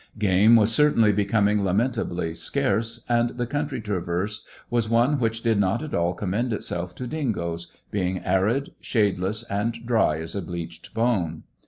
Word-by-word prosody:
Game 105 +2 +5
was 110 0 +4
certainly 115 -6 +4
becoming 105 0 +2
lamentably 95 -4 0
scarce, 115 +7 -1
and 120 0 +2
the 120 - 0
country 145 0 -2
traversed 100 0 -2 0.2
was 120 -2 +1
one 120 +5 +3
which 115 -1 -1
did 115 -3 +2
not 100 +7 +1
at 155 - -7
all 85 +1 +1
commend 110 +5 -1
itself 90 -3 -3
to 125 - -5
dingoes, 95 - -3 0.2
being 95 -2 -1
arid, 100 +9 +1
shadeless, 105 -1 0
and 115 +3 -2
dry 110 -10 +2
as 80 +3 -3
a 100 - -1
bleached 85 0 -7
bone. 100 -9 0
105 Hz, 155 wpm, -25 LUFS, 90-115 Hz, 0.2 s, Game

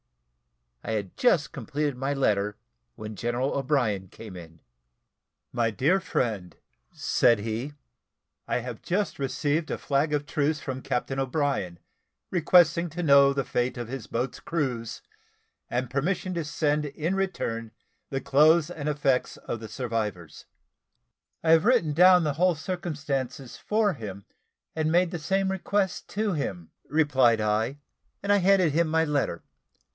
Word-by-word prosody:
I 110 - -3
had 100 -4 -3
just 170 - +2
completed 150 -1 -3
my 135 +2 -2
letter 105 -7 0 0.4
when 110 0 -7
General 120 +5 -1
O'Brien 125 -9 0
came 105 +1 -11
in. 85 -2 -11 0.9
"My 115 -1 +1
dear 145 - +2
friend," 110 - -2 0.4
said 115 - +3
he, 115 +7 -4 0.7
"I - - 0
have 120 -2 -7
just 200 -1 -1
received 145 +3 -1
a - - -2
flag 140 +2 0
of 145 -1 0
truce 150 +1 0
from 130 -1 -5
Captain 135 +2 -2
O'Brien, 135 - -1 0.5
requesting 170 -1 +4
to 175 +3 -5
know 140 -2 +6
the 140 -1 -1
fate 125 +1 -1
of 120 -1 -5
his 130 -3 -6
boats' 125 +2 -3
crews, 130 -9 -3 0.7
and 125 +1 -1
permission 170 +8 -1
to 170 -2 -2
send 150 0 0
in 150 +5 -2
return 120 -13 -2 0.4
the 135 - -2
clothes 155 +4 +4
and 150 -3 -3
effects 140 -3 0
of 115 - -5
the 110 -1 -8
survivors." 105 - -4 1.0
"I 160 - +3
have 165 +2 +5
written 230 -11 +3
down 180 +2 +6
the 150 -2 0
whole 175 +3 +2
circumstances 145 -7 -4
for 210 -2 +1
him, 100 -6 -8 0.5
and 155 0 0
made 175 +1 +3
the 175 - -4
same 190 +4 0
request 190 0 -1
to 210 -1 -1
him," 95 - -4
replied 135 -6 +3
I; 110 +5 0 0.5
and 200 - +1
I - - +5
handed 190 -3 +4
him 170 +1 +2
my 160 +1 +2
letter. 140 - -1
140 Hz, 145 wpm, -27 LUFS, 120-165 Hz, 1.0 s, know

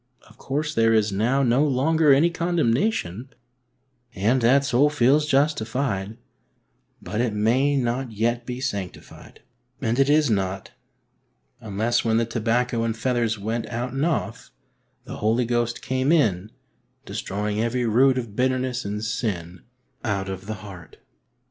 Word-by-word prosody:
Of - - -19
course 150 +3 -3
there 115 -2 +3
is 110 -1 +2
now 120 +8 +1
no 125 +3 +3
longer 150 +2 +3
any 150 +6 +4
condemnation, 145 - -1 0.9
and 115 +7 +1
that 135 +4 +4
soul 140 +3 +3
feels 150 +1 +3
justified; 120 -7 0 0.9
but 105 +6 -2
it 120 -3 0
may 125 +7 +2
not 125 0 -1
yet 120 +3 -1
be 125 +1 -6
sanctified, 100 -9 -6 0.4
and 115 +3 -1
it 135 +1 +3
is 150 +1 +4
not, 95 -3 -2 0.9
unless 110 +3 -1
when 110 -1 +2
the 115 - +2
tobacco 115 +1 0
and 115 -1 -2
feathers 115 -2 0
went 110 +3 -3
out 120 +2 -4
and 135 +1 -1
off, 165 0 -2 0.6
the - - -7
Holy 115 +3 +1
Ghost 120 0 -1
came 130 +3 0
in, 105 - +2 0.6
destroying 105 +2 -3
every 120 +2 0
root 130 +4 +4
of 115 -5 -5
bitter 130 +1 +1
ness 125 -1 -3
and 105 +1 -4
sin 90 -6 -3 0.4
out 100 -4 -2
of 95 +1 -7
the 110 - -3
heart. 90 -4 -12
120 Hz, 145 wpm, -24 LUFS, 110-135 Hz, 0.9 s, any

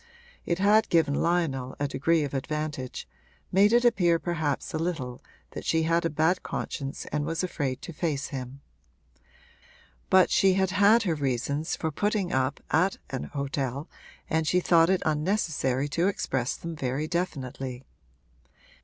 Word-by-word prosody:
It 170 - +1
had 210 +3 +4
given 160 -4 +3
Lionel 145 -6 0
a 145 - 0
degree 160 +3 +1
of 140 - -4
advantage, 145 - -4 0.4
made 200 +3 +5
it 240 +1 +4
appear 175 -8 +4
perhaps 160 -4 -2
a 155 - -1
little 145 -8 -3 0.3
that - - -7
she 160 0 +1
had 165 +1 +1
a - - +2
bad 160 +4 +1
conscience 140 -2 -5
and 150 0 0
was 165 +4 -2
afraid 140 -7 -3
to 170 - -7
face 150 -3 -2
him. 135 0 -7 1.5
But 185 -1 +5
she 190 -1 +4
had 190 -1 +1
had 205 +4 +5
her 175 -6 +1
reasons 140 +2 -1
for 160 - -2
putting 205 +2 0
up 130 +2 0
at 180 +5 +2
an 130 - -3
hotel, 140 0 -3 0.4
and 160 -1 0
she 180 - +3
thought 170 -1 +4
it 190 -1 +2
unnecessary 150 -5 0
to 170 +5 +1
express 130 -10 -1
them 170 -1 -6
very 140 +2 -2
definitely. 135 -7 -4
160 Hz, 155 wpm, -27 LUFS, 140-175 Hz, 1.5 s, made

